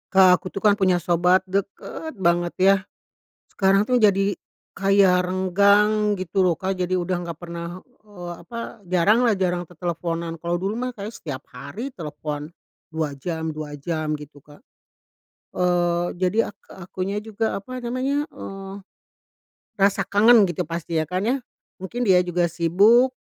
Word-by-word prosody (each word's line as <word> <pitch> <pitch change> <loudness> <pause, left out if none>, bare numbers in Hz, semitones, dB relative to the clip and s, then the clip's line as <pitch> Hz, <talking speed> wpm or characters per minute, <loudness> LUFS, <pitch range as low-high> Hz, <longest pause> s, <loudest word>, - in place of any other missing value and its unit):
Kak, 185 -1 +6
aku 185 - -6
tuh - - -4
kan 205 0 +4
punya 185 -3 +2
sobat, 175 +2 +3
deket 200 - -4
banget 175 -1 +1
ya. 195 +1 +6 0.7
Sekarang 195 +2 +2
tuh 250 - +2
jadi, 200 -3 +3 0.4
kayak 195 -2 +4
renggang 200 +3 +3
gitu 185 +1 0
loh 175 -3 +1
Kak, 190 0 -1
jadi 185 0 0
udah 180 +1 -1 0.2
gak 165 - -12
pernah, 170 0 -7 0.2
eee, 180 -5 -8
apa, 230 -2 -8
jarang 185 +6 +3
lah, 220 -5 +2
jarang 180 -1 0
teleponan, 170 -1 -3
kalau 170 +1 -2
dulu 195 +4 -2
mah 250 +2 -2
kayaknya 215 -1 -8
setiap 140 -5 -7
hari 210 - -8
telepon, 150 -3 -6 0.4
2 155 -3 -2
jam, 160 +2 -4
2 150 -1 -6
jam, 155 0 -2
gitu 145 -1 -13
Kak, 145 0 -17 0.9
eee, 175 -1 +1
jadi 185 +4 0 0.2
ak - - -60 0.3
akunya 190 +3 -3
juga, 220 0 -2
apa 255 +6 -8
namanya, 260 +4 -1
eee, 195 0 -8 1.0
rasa 195 0 +3
kangen 220 +3 +5
gitu, 170 - -3
pasti 165 0 -4
ya 155 - +1
kan, 180 +4 -2
ya, 240 +6 +1 0.4
mungkin 210 +7 -4
dia 190 -6 +5
juga 175 -1 0
sibuk, 200 +10 +4
185 Hz, 150 wpm, -23 LUFS, 170-205 Hz, 1.0 s, Kak